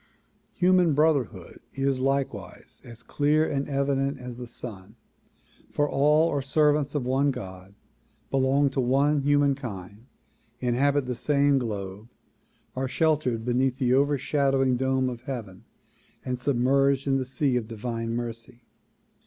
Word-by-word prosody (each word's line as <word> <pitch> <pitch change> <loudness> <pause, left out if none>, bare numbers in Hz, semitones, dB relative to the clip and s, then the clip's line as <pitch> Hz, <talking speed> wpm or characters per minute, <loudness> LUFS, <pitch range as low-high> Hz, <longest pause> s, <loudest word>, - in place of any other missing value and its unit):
Human 180 -4 +3
brotherhood 135 - 0 0.2
is 135 -1 0
like 135 +1 0
wise - - -12
as 115 -1 -11
clear 150 +4 +1
and 140 +1 -2
evident 140 0 0
as 125 -2 -8
the 125 -1 -7
sun, 110 -3 -9 0.7
for 145 - 0
all 150 +4 +3
are 145 - -1
servants 145 +1 +1
of 140 -4 -1
one 135 +3 +2
God, 95 -6 -7 0.6
belong 135 +1 +2
to 135 - 0
one 140 +4 +2
humankind, 135 -8 -1 0.5
inhabit 135 +3 +1
the 125 - -2
same 140 +2 +2
globe, 105 -3 -5 0.7
are 130 +1 -2
shel 160 +4 +2
tered 120 -6 -3
beneath 125 +1 +1
the 125 -2 +1
overshadowing 135 -1 +2
dome 130 +1 0
of 120 -2 -5
heaven 110 -9 -7 0.6
and 125 -1 -3
submerged 135 +1 +2
in 135 -1 +2
the 130 - -1
sea 135 0 0
of 120 -3 -1
divine 115 +1 -4
mercy. 115 0 -6
135 Hz, 135 wpm, -26 LUFS, 120-140 Hz, 0.7 s, Human